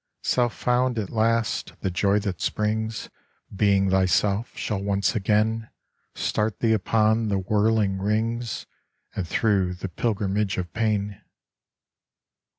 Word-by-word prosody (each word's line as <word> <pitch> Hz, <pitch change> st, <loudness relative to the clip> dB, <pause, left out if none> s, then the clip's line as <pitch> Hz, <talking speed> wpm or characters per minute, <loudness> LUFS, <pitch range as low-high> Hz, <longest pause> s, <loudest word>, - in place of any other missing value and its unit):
Self 120 Hz, -2 st, +1 dB
found 125 Hz, 0 st, +1 dB
at 105 Hz, -3 st, -3 dB
last, 115 Hz, 0 st, 0 dB
the 95 Hz, -, -1 dB
joy 100 Hz, +3 st, +2 dB
that 100 Hz, -4 st, -4 dB
springs 110 Hz, +1 st, -2 dB, 0.4 s
Being 100 Hz, -1 st, +3 dB
thyself, 100 Hz, +4 st, +1 dB
shall 100 Hz, -3 st, -2 dB
once 100 Hz, +3 st, 0 dB
again 110 Hz, +2 st, +1 dB, 0.5 s
Start 105 Hz, 0 st, -1 dB
thee 115 Hz, -1 st, +3 dB
upon 110 Hz, +1 st, +2 dB
the 100 Hz, -2 st, +1 dB
whirling 105 Hz, 0 st, +1 dB
rings 110 Hz, +3 st, -1 dB, 0.5 s
And 90 Hz, -, -3 dB
through 95 Hz, -3 st, +1 dB
the 90 Hz, +2 st, -5 dB
pilgrimage 100 Hz, 0 st, -1 dB
of 90 Hz, -2 st, -4 dB
pain. 105 Hz, -2 st, -1 dB
105 Hz, 120 wpm, -25 LUFS, 100-110 Hz, 0.5 s, Being